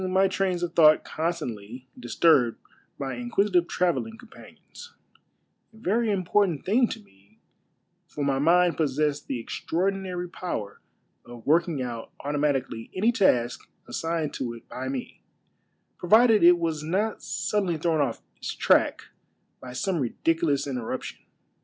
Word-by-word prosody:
my 190 +1 +3
trains 185 -2 -1
of 175 -1 -3
tliouglit 155 -2 +6
constantly 130 -8 -4
disturbed 125 0 +3 0.4
by 135 -1 -3
inquisitive 200 -7 +1
travel 180 0 +1
ling 225 0 -10
companions 355 - -14 0.4
— - - -47
a - - -16
very 220 +2 0
important 185 -4 +1
thing 235 +6 +3
to 225 - -6
me, 100 - -26 0.7
for 145 - -5
my 135 -1 +1
mind 175 +3 +4
possessed 150 -1 0
the 130 - -3
extraordinary 180 +7 -2
power 140 - -5 0.5
of 120 -1 -12
working 165 -2 +2
out 120 -2 -6
automatieally 140 -5 -1
any 215 +6 +3
task 125 - +2 0.3
assigned 165 -2 -2
to 120 -3 -4
it 115 - -15
by 130 +1 -6
me, 130 -1 -5 0.8
provided 220 +3 +5
it 175 +1 +8
was 165 -3 -2
not 195 +7 -1
suddenly 195 -6 -1
thrown 160 -1 +1
off 140 - -1 0.2
its - - -5
track - - +2 0.6
by 130 - -9
some 180 +8 -1
ridiculous 145 +2 0
interruption. 125 -5 -5
165 Hz, 135 wpm, -26 LUFS, 135-190 Hz, 0.8 s, it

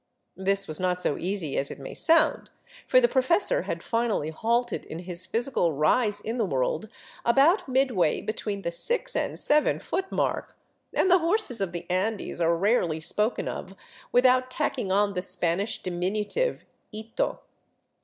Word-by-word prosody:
This 195 +1 +2
was 155 - -3
not 180 -1 0
so 150 - 0
easy 180 -5 -3
as 140 - -1
it - - -7
may 135 - -8
sound, 330 0 +3 0.4
for - - +6
the 485 - +4
professor 350 - +2
had - - -3
finally 230 -9 -1
halted 235 +6 -1
in 160 - -7
his 180 +1 -6
physical 230 - +1
rise 205 - +2
in 225 +3 -4
the 230 - +1
world 155 +5 -1 0.3
about 280 - +4
midway 255 - +2
between 210 -2 -4
the 170 - -2
six 485 - +1
and - - -1
seven 300 0 +2
foot 385 0 -3
mark, - - -2 0.3
and 375 - +2
the 365 - +6
horses 335 - 0
of 190 -3 -1
the 175 0 -6
Andes 190 0 -2
are 170 0 +3
rarely 180 -5 +1
spoken 210 +8 -1
of 190 +1 -6 0.4
without 255 +1 +4
tacking 255 -7 -2
on 200 +1 +2
the 180 - -2
Spanish 180 +4 -1
diminutive, 205 - -2 0.3
ito. 220 +1 -3
210 Hz, 160 wpm, -26 LUFS, 180-255 Hz, 0.4 s, for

